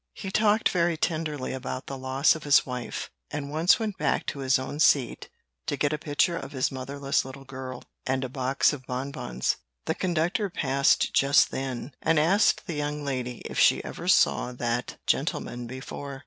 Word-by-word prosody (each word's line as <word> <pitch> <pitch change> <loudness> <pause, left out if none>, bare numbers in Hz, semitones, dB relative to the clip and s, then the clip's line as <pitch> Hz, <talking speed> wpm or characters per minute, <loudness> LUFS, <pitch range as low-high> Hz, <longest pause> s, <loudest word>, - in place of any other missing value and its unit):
He 195 - -6
talked 215 +1 +3
very 170 -2 +1
tenderly 155 -5 -2
about 130 0 -5
the 135 - -5
loss 130 +2 +2
of 160 - -7
his 145 -1 +5
wife, 125 -2 -5 0.2
and 145 -1 -5
once 160 +4 +4
went 215 -4 -4
back - - +1
to 140 - -4
his 130 -1 +3
own 130 +3 -5
seat 140 -5 +3 0.4
to 145 -3 -1
get 145 +1 +1
a 150 - -2
picture 155 +4 +1
of 140 -3 -6
his 130 -2 0
motherless 135 +1 -1
little 135 +1 -9
girl, 130 -1 -7 0.2
and 130 0 0
a - - -2
box 130 +2 +1
of 130 -3 -8
bonbons. 125 - -2 0.3
The - - +1
conductor 175 +3 0
passed 140 -4 +2
just 140 +1 +4
then, 130 0 -4
and 165 0 +2
asked 190 +10 +3
the 175 - -4
young 150 0 -3
lady 125 -3 -3
if - - -3
she - - +5
ever - - -7
saw 125 - +4
that 120 0 -2
gentleman 120 0 -1
before. 135 +2 -7
140 Hz, 180 wpm, -27 LUFS, 130-155 Hz, 0.4 s, his